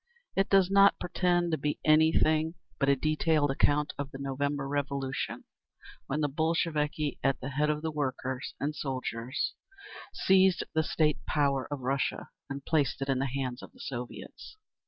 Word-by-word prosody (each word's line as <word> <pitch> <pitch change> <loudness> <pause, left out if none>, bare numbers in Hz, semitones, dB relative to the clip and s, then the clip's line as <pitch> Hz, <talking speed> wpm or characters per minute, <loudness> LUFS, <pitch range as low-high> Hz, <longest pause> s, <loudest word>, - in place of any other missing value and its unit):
It 195 - +2
does 195 -1 +4
not 200 0 +6
pretend 175 -1 +1
to 160 - 0
be 145 +1 -1
anything 160 +1 +4 0.2
but 140 - +2
a 140 - +5
detailed 155 0 +1
account 145 +2 +2
of 140 -1 -3
the 135 - -9
November 140 +1 -2
Revolution, 140 -1 -2 0.6
when 150 +3 -1
the 145 - +2
Bolsheviki, 155 -1 0
at 135 -1 +2
the 130 - -5
head 150 +2 +1
of 150 0 -1
the 160 - -1
workers 130 -3 -3
and 150 +2 -2
soldiers, 130 -2 -3 0.6
seized 190 -1 +4
the 160 - +3
state 155 -1 0
power 140 -3 +1
of 145 -2 -3
Russia 135 +2 -1 0.2
and 140 0 -6
placed 145 -4 +1
it 135 - -6
in 135 -1 +2
the 135 - 0
hands 130 -1 -3
of - - -12
the - - -20
Soviets. 125 - -7
145 Hz, 165 wpm, -29 LUFS, 135-160 Hz, 0.6 s, not